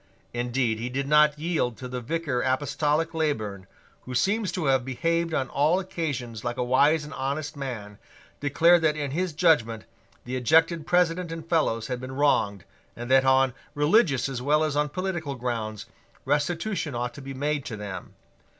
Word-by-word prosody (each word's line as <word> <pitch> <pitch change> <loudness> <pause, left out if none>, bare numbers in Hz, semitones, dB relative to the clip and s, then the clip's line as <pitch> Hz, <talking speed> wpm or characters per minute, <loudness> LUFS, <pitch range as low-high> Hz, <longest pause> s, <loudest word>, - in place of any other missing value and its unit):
Indeed 120 -1 0
he 120 +2 -3
did 135 +2 -2
not 150 0 +5
yield 150 -7 -1
till 130 - -7
the 125 0 -4
Vicar 145 -1 -2
Apostolic 150 +4 0
Leyburn, 110 -12 -2 0.4
who 125 - -6
seems 200 - +1
to 180 -5 -3
have 135 -2 +3
behaved 165 +6 -1
on 135 -4 0
all 155 +6 +2
occasions 140 - -4
like 120 - -3
a - - 0
wise 145 +5 +3
and 150 - -9
honest 145 +3 -3
man, 115 -7 -6 0.4
declared 165 +4 +4
that 155 -1 +2
in 145 -2 -3
his 180 +4 -1
judgment 150 -9 +2 0.4
the 125 +1 -4
ejected 160 +5 +3
President 180 -1 +2
and 165 -1 -7
Fellows 150 -10 +1
had 125 +1 -4
been 130 +1 -6
wronged, 105 -9 +2 0.3
and 120 +2 -6
that, 135 0 +5
on 130 -1 +4 0.2
religious 150 - +3
as 130 -3 -4
well 150 +4 +2
as 155 -2 -1
on 150 0 +1
political 170 -4 -3
grounds, 115 -4 -4 0.4
restitution 155 - -1
ought 120 0 -2
to 140 - -10
be 135 0 -7
made 145 +1 -1
to 110 - -5
them. 100 -2 -7
145 Hz, 175 wpm, -26 LUFS, 125-160 Hz, 0.4 s, not